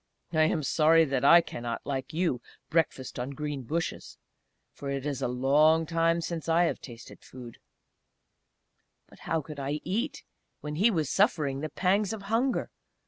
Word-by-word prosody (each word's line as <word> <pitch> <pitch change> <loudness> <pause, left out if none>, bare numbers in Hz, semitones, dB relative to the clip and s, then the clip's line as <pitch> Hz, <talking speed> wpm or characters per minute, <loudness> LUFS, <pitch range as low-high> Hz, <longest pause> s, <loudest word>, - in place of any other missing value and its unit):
I 155 -1 +4
am 155 -1 0
sorry 160 +3 +4
that 135 -3 -1
I 170 +5 +8
cannot, 120 -7 -6
like 135 -2 -3
you, 160 -7 -1 0.3
breakfast 150 -6 -1
on 130 +3 -4
green 150 -2 -3
bushes!... 160 +7 -4 0.6
For 140 - -7
it 140 0 -3
is 140 -2 -3
a - - 0
long 145 +6 +3
time 165 +1 +1
since 165 -1 -4
I 165 +2 +4
have 170 - -1
tasted 120 -3 -11
food!" 125 -2 -11 1.5
But - - -19
how 165 - +1
could 150 0 -9
I 140 +2 -2
eat 250 +9 -3 0.4
when 150 0 -6
he 210 +7 +5
was 160 -9 0
suffering 155 - +1
the 155 +2 -4
pangs 195 +6 +1
of 210 -3 -7
hunger? 250 +3 0
155 Hz, 165 wpm, -28 LUFS, 135-170 Hz, 1.5 s, I